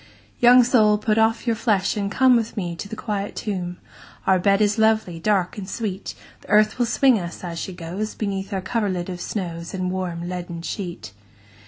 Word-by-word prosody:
II. - - -27
Young 245 +1 +7
soul 220 -4 +4
put 215 +1 +1
off 225 +2 +2
your 230 -2 +1
flesh, 210 -4 +1
and 200 -1 -1
come 260 +1 +5
With 230 -1 -1
me 175 -4 -2
into 175 +4 -7
the 220 - -5
quiet 205 -3 -4
tomb, 180 -4 -4 0.5
Our 190 -1 +4
bed 195 +2 +3
is 210 +1 +2
lovely, 220 -6 +2
dark, 195 +1 0
and 190 -1 -7
sweet; 205 -4 -4 0.3
The - - -18
earth 215 +3 +4
will 240 - +2
swing 250 0 +4
us, 175 0 -7
as 170 -2 -5
she 190 - -4
goes, 180 +5 -5
Beneath 195 -1 -3
our 190 -2 -2
coverlid 190 -4 -1
of 180 -1 -6
snows, 170 -4 -4
And 185 -1 -2
the - - -3
warm 175 -2 -3
leaden 175 -2 -5
sheet. 175 - -6
200 Hz, 205 wpm, -23 LUFS, 180-220 Hz, 0.5 s, Young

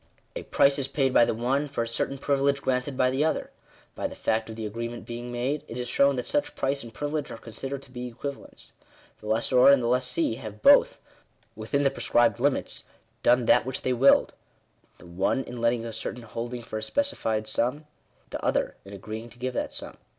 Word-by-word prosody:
A - - -3
price 140 +1 +3
is 135 - -1
paid 135 -2 0
by 120 - +6
the - - 0
one, 135 +6 0
for 135 -4 -2
a - - -5
certain 125 +4 -2
privilege 140 0 +1
granted 130 +1 -1
by 125 0 +3
the 135 +3 +1
other. 160 - -1 0.4
By - - -2
the - - -10
fact 110 0 -1
of 110 - -6
the 110 -1 -5
agreement 115 +2 -5
being 120 +1 -6
made, 130 +5 -2
it 115 - -7
is 125 0 -3
shown 140 +3 +3
that 125 -1 -3
such 145 - -1
price 140 +1 -1
and 115 - -9
privi 145 +5 -4
lege 150 -2 -2
are - - -7
considered 135 +5 -6
to 130 - -17
be 125 -1 -5
equivalents. 140 +4 -8 0.5
The 105 - -10
lessor 115 +3 +4
and 140 -1 +7
the 120 - -2
lessee 125 +1 +1
have 105 -4 -9
both, - - +6 0.6
within 110 +6 -1
the 135 - +3
prescribed 120 -3 +2
limits, 140 +2 0 0.4
done 125 0 +4
that - - +5
which 130 +1 -4
they 130 - +1
willed: 130 +3 +5 0.6
the - - -16
one 95 +9 0
in 125 - -8
letting 115 0 +1
a 115 - -5
certain 120 +2 -5
holding 120 +2 -5
for 110 -1 -5
a - - -8
specified 115 - -1
sum; 125 +7 -1 0.5
the - - -5
other - - 0
in 100 - -11
agreeing 110 +4 -7
to 120 - -18
give 130 +1 -3
that - - -2
sum. - - -8
125 Hz, 215 wpm, -27 LUFS, 115-135 Hz, 0.6 s, and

